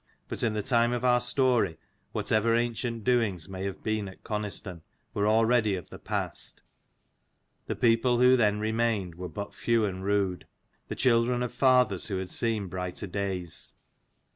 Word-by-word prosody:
But - - -4
in 110 -2 +1
the 105 - -1
time 120 -2 +2
of 125 +1 -2
our 125 -1 +4
story, 125 - +2 0.3
whatever 115 +2 +1
ancient 115 -1 -2
doings 110 -9 +1
may 95 0 -5
have 100 -1 -5
been 110 -2 -1
at 95 - -12
Coniston, 105 -5 -4 0.3
were 100 0 +1
already 110 -1 +3
of 90 - -8
the - - -9
past: - - -3 1.0
the - - -2
people 120 +1 +3
who 125 +1 +6
then 105 -4 +2
remained 110 -4 0
were 90 +2 -7
but 100 +6 -6
few 115 -2 +1
and 95 -2 -4
rude, 100 -2 0 0.4
the - - -5
children 120 0 +2
of 125 - -4
fathers 125 -8 +3
who 100 -4 -2
had 95 -1 -5
seen 110 -3 0
brighter 90 +1 -5
days. 95 -3 -3
110 Hz, 165 wpm, -28 LUFS, 95-120 Hz, 1.0 s, who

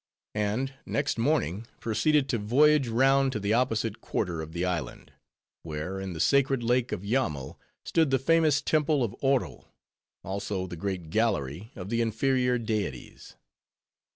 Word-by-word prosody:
And 110 +6 -1
next 145 -4 -1
morning 115 - 0
proceeded 145 +5 +2
to 115 - 0
voyage 140 +6 +4
round 135 +3 +3
to 105 - -2
the 100 +1 0
opposite 115 -2 0
quarter 90 -6 -2
of 80 0 -7
the 85 +2 -2
island; 90 -3 -4 0.5
where, 80 +4 -5
in 95 -1 -5
the 80 - -7
sacred 135 - +3
lake 125 +1 +1
of 100 -3 -3
Yammo, 100 - -1 0.3
stood 160 -3 +2
the 135 - +3
famous 155 +1 +3
temple 150 -3 +2
of 105 -5 -3
Oro, 135 -2 0 0.6
also 95 0 -3
the 90 - -7
great 90 -2 -4
gallery 105 - -1
of 90 - -7
the 115 +1 +1
inferior 125 +2 +1
deities. 110 - -4
115 Hz, 150 wpm, -28 LUFS, 95-135 Hz, 0.6 s, voyage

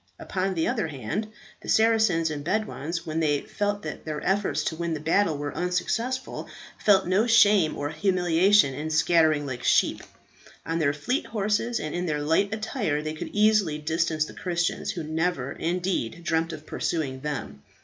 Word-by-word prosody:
Upon 190 0 -2
the 160 - 0
other 230 -8 0
hand, 145 - -4 0.3
the - - -9
Saracens 220 -8 +3
and 145 -1 -5
Bedouins 170 -3 -2
when 160 0 -2
they 145 -3 +1
felt 205 0 -2
that - - -6
their 155 -1 -4
efforts 190 -6 0
to - - -2
win 170 0 -2
the - - -5
battle 160 +1 +1
were 145 0 -4
unsuccessful, 230 +9 -2 0.3
felt 195 -2 +5
no 195 +6 +2
shame 205 -7 +5
or 145 +1 -3
humiliation 180 -1 +3
in 150 +4 -4
scattering 155 -2 +3
like 130 -3 -5
sheep. - - +3 0.6
On 165 +1 -1
their 145 -3 +2
fleet 155 - -2
horses 215 +2 0
and 155 - -4
in 175 +1 -2
their 150 -2 -1
light 165 +7 +2
attire 215 - -2
they 155 0 -3
could 155 - -6
easily 210 -7 +3
distance 160 0 0
the - - -10
Christians, 175 -2 -2
who 175 -6 -3
never, 155 -3 -1
indeed, 175 -4 -2
dreamt 165 0 0
of 155 -1 -8
pursuing 140 -7 -2
them. 135 - -5
165 Hz, 170 wpm, -26 LUFS, 155-205 Hz, 0.6 s, felt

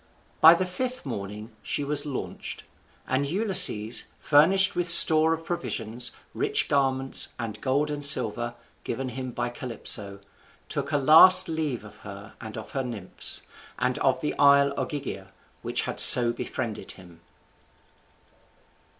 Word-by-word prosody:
By 165 +2 +7
the 185 - -3
fifth 250 +6 -6
morning 105 -2 -9
she 145 - -5
was 145 +1 -3
launched; 140 - -8 0.4
and 135 +2 -2
Ulysses, 180 - +1
furnished 185 +7 +2
with 175 0 -2
store 160 -1 +7
of 165 0 -5
provisions, 120 -8 -4 0.2
rich - - -1
garments, 135 -1 -1
and 110 -3 -8
gold 145 +3 -2
and 145 -1 -7
silver, 120 -3 +3 0.3
given 130 +2 -6
him 130 +1 -8
by 120 0 -5
Calypso, 110 -5 -3 0.5
took - - -5
a 145 - 0
last 175 +6 +5
leave 155 -8 -5
of 105 0 -16
her 100 +1 -13
and 110 -1 -10
of 110 - -11
her 135 -3 -5
nymphs, 110 -7 -1 0.3
and - - -3
of - - -1
the 75 - -5
isle 140 0 +3
Ogygia 135 - -7 0.3
which - - -4
had - - -6
so 120 -1 +9
befriended 115 -2 -7
him. 90 -3 -19
130 Hz, 140 wpm, -23 LUFS, 110-155 Hz, 0.5 s, so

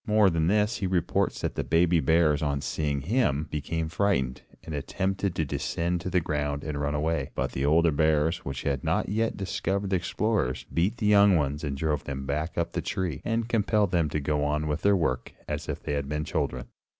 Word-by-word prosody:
More 105 -3 +5
than 80 -1 +1
this, 105 +3 +2
he 95 - -1
reports 90 -3 0
that - - -2
the - - -2
baby 85 +1 +3
bears, 80 -2 +3
on 70 -2 0
seeing 70 -2 -1
him, 80 - +1
became 80 +2 -2
frightened, 80 -8 0 0.2
and 80 - -7
attempted 95 +5 -2
to 80 - 0
descend 85 +5 -2
to 90 - -3
the 90 - +3
ground 75 -2 -2
and 75 -2 -3
run 70 0 -1
away, 75 -2 -1
but - - -1
the 65 - -2
older 85 +2 +4
bears, 80 +2 +2
which 70 -2 -6
had 70 -2 -1
not - - 0
yet 110 +2 0
discovered 100 0 -2
the 95 - +3
explorers, 90 - -1
beat 95 +8 +1
the 115 - -2
young 100 -2 +6
ones 75 -1 0
and 70 -2 -2
drove 75 -1 -1
them 70 -1 -4
back 75 +4 -2
up 85 - 0
the - - -2
tree, 90 -7 -3
and 115 0 -1
compelled 105 -4 +2
them 85 -4 +2
to 75 - -1
go 75 +1 0
on 75 +1 0
with 75 +1 -2
their 100 -1 +4
work, 65 -8 -1
as - - -4
if - - -4
they - - -2
had 70 -1 -2
been 75 +1 -2
children. 70 -5 -2
80 Hz, 215 wpm, -27 LUFS, 75-95 Hz, 0.2 s, young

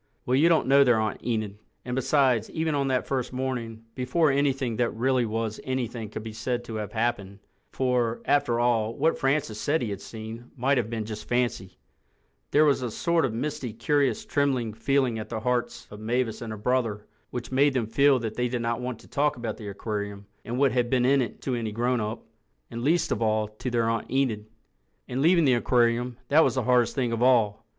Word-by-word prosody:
Well, 125 - 0
you 150 +6 +5
don't 165 -2 +3
know 140 +1 +6
their 120 -4 +3
Aunt 110 -1 -2
Enid. 110 -3 -2 0.3
And 125 0 -3
besides, 130 -3 +2
even 160 -1 -1
on 140 -1 0
that 130 -1 0
first 130 -2 -2
morning, 125 -4 -4
before 135 +5 +1
anything 135 -4 0
that 120 -1 +2
really 125 +1 +1
was 110 0 -3
anything 120 -4 -3
could 110 - -6
be 110 -1 -7
said 120 +2 -2
to 115 -2 -6
have 105 -1 -5
happened—for, 115 +2 -2
after 140 -5 +2
all, 115 -2 +1
what 160 +3 +1
Francis 135 -6 0
said 150 -1 +1
he 110 - -3
had 100 -1 -5
seen 115 +2 -8
might 130 +2 +2
have 115 -2 -2
been 115 -2 -3
just 110 -1 -7
fancy—there 95 - -2
was 140 -3 +3
a 125 - -2
sort 170 +7 +1
of 130 - -1
misty, 130 -2 -3
curious, 145 - 0
trembling 135 - 0
feeling 125 0 +1
at 110 0 -7
the 110 -2 -4
hearts 125 +1 -2
of 105 - -9
Mavis 115 +1 -1
and 115 -2 -5
her 110 - -5
brother 110 -2 -1 0.2
which 120 -1 -6
made 135 +1 +3
them 120 -3 +1
feel 140 +5 +4
that 115 -3 -4
they 125 0 0
did 120 -1 -3
not 115 +1 -1
want 125 -2 -4
to - - -17
talk 145 +1 0
about 115 -3 -4
the 105 - -8
aquarium 100 0 -5 0.2
and 120 +2 -4
what 135 -1 +3
had 120 -1 0
been 125 -1 +2
in 135 +1 +4
it 120 - -5
to 130 - -1
any 115 -3 -2
grown 120 +2 0
up—and 105 - -8
least 160 +7 +1
of - - -1
all 110 -1 +1
to 110 +4 -6
their 120 -2 +1
Aunt 115 0 -1
Enid. 120 -6 0 0.6
And 125 +2 -2
leaving 170 +1 +4
the 130 - +4
aquarium, 120 0 +1
that 155 +3 +6
was - - +1
the 130 - 0
hardest 125 0 +2
thing 125 -4 0
of 115 0 -2
all. 115 -4 +3
120 Hz, 210 wpm, -26 LUFS, 110-130 Hz, 0.6 s, know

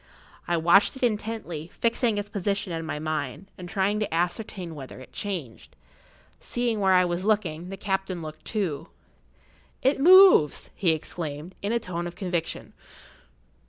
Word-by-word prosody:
I 175 - +1
watched 175 +8 +4
it 265 - -7
intently, 210 -8 -2
fixing 230 -1 0
its 205 0 -2
position 200 -2 -2
in 165 -1 -4
my 155 - -3
mind, 155 +4 -4
and 180 -1 -9
trying 200 +3 +1
to 210 - -2
ascertain 175 +1 -2
whether 135 -4 -9
it 130 - -13
changed. 170 - -5 0.6
Seeing 240 -3 -1
where 190 -1 +4
I 180 0 +5
was 175 +1 -2
looking, 185 -5 0
the 195 - -6
captain 190 -3 -2
looked 155 0 -9
too. 190 -10 -3 0.9
"It 265 +2 +3
moves!" 370 - +7
he 185 - +1
exclaimed, 155 +1 -6
in 205 - -1
a 235 - +2
tone 175 -5 -4
of 175 - -8
conviction. 175 -4 -4
185 Hz, 155 wpm, -26 LUFS, 165-210 Hz, 0.9 s, moves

